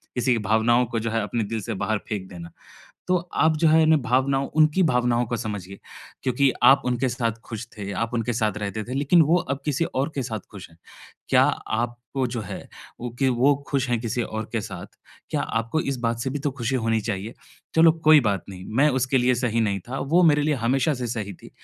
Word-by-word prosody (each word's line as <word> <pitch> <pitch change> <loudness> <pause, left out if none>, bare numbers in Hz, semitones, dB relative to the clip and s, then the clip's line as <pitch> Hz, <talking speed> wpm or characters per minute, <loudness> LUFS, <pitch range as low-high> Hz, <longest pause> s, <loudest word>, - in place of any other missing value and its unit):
किसी 125 +1 +1
की - - +1
भावनाओं 115 +3 +3
को 115 - 0
जो 115 0 -3
है, 115 0 0
अपने 115 +2 -2
दिल 110 +2 -4
से - - -4
बाहर 110 - 0
फेंक 100 -3 -4
देना। 85 -2 -9 0.6
तो 180 - +3 0.2
आप 160 0 +3
जो 165 +1 +4
है, 160 +1 +5
इन 160 0 +5
भावनाओं 135 +2 +1
उनकी 155 +4 +4
भावनाओं 125 -3 +2
को 120 - -2
समझिए, 100 -4 -6 0.5
क्योंकि 130 +1 +2
आप 135 +3 +7
उनके 125 +1 0
साथ 120 -2 -1
खुश 115 0 -7
थे, 100 -1 -5
आप 115 +5 -2
उनके 120 0 -1
साथ 110 -2 0
रहते 105 +1 -4
थे, 125 - -6
लेकिन 145 +5 +4
वो 170 - +5
अब 140 -5 -2
किसी 150 +2 +1
और 135 -3 -2
के 135 - -1
साथ 110 -3 -4
खुश 100 -3 -10
हैं। 80 - -21 0.5
क्या - - +5
आपको 120 +3 -2
जो 120 -1 -4
है, 95 - -8 0.3
वो 120 0 -4
कि 135 - +4
वो 130 +3 +3
खुश 135 -2 0
हैं 120 - +2
किसी 120 +1 -2
और 110 -1 -5
के 115 - 0
साथ, 110 - -7 0.4
क्या - - 0
आपको 115 +7 -1
इस - - -4
बात 115 0 -1
से 130 - -2
भी 145 - -3
तो 145 0 -1
खुशी 120 +3 0
होनी 115 -1 +2
चाहिए, 105 +1 -4 0.4
"चलो, 165 0 +7
कोई 155 -2 +5
बात 100 -2 -1
नहीं। 90 -1 -9 0.2
मैं 150 - +6
उसके 130 +2 +2
लिए 125 0 +3
सही 115 -1 +1
नहीं 100 -3 0
था, 135 +2 -4
वो 165 +6 +2
मेरे 150 -2 +4
लिए 150 0 +1
हमेशा 135 +5 +2
से - - -1
सही 105 -4 -4
थी।" - - -15
120 Hz, 225 wpm, -24 LUFS, 110-135 Hz, 0.6 s, आप